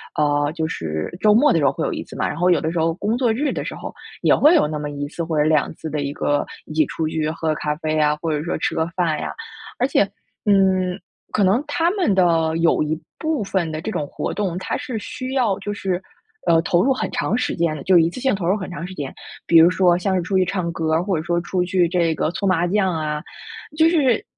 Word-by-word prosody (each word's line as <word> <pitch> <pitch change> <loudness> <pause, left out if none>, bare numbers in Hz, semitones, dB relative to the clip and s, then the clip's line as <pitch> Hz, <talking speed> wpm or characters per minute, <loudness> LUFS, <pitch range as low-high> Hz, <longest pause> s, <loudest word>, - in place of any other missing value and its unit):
呃， 145 -1 +1
就 160 -2 -2
是 80 - -4
周 210 +1 +5
末 275 +7 +5
的 - - +3
时 145 - +1
候 135 - +4
会 - - -3
有 - - -1
1 - - -4
次 - - -13
嘛， - - 0
然 - - -4
后 180 +1 +2
有 170 - +3
的 160 - -1
时 170 - -2
候 165 0 +1
工 210 +6 -1
作 245 -3 +2
日 280 +6 0
的 - - -4
时 - - -4
候 - - -7 0.3
也 - - +4
会 305 +4 +5
有 150 - +4
那 155 0 -3
么 150 0 -4
1 145 0 -4
次 170 +3 -5
或 160 -2 -2
者 150 - +4
2 155 -2 +2
次 160 - -7
的 150 0 -2
一 140 0 -3
个 145 -1 0 0.2
一 - - -9
起 155 0 +3
出 160 +3 -3
去 155 0 -1
喝 160 0 -4
个 155 - +1
咖 150 0 -2
啡 155 -1 -2
呀， 150 -1 +3
或 165 -2 -1
者 150 0 -1
说 175 - -2
吃 - - -1
个 160 - +1
饭 165 -4 0
呀。 - - -4 0.5
而 255 - +2
且， 270 - +3 0.4
嗯， 190 -3 +3 0.3
可 205 - +1
能 195 +7 +3
他 325 +3 +1
们 370 - +1
的 165 -4 +2
有 165 -2 +3
一 155 +1 -2 0.2
部 315 -8 -1
分 185 -4 -1
的 155 0 -4
这 220 - -4
种 150 - -2
活 - - -4
动， 190 -4 -2
它 - - -3
是 245 - -5
需 255 +4 -6
要 235 -8 +1
就 205 - -4
是， 190 -3 -2 0.5
呃， 165 -1 +5
投 175 +1 +2
入 270 +1 +3
很 - - -3
长 245 -2 -1
时 250 - -1
间 165 -2 0
的， 140 - -7
就 185 -2 +5
一 165 0 +4
次 215 - -8
性 265 -4 +2
投 190 -3 -4
入 185 +4 +3
很 190 -3 -5
长 170 -1 -6
时 185 - -8
间， 145 -6 -5 0.3
比 170 - +6
如 165 +1 +8
说 180 -1 +3
像 190 +1 0
是 180 - +1
出 190 +3 0
去 185 - +3
唱 180 -2 -2
歌 160 -1 -1
儿， 165 - +2
或 190 -2 0
者 155 - -3
说 170 +1 0
出 180 +1 -1
去 180 -1 +2
这 170 -2 +1
个 - - 0
搓 200 - -2
麻 175 -2 +2
将 190 -1 +1
啊， 150 -1 -2 0.6
就 320 +1 +5
是 275 -9 +2
175 Hz, 285 characters per minute, -21 LUFS, 155-200 Hz, 0.6 s, 如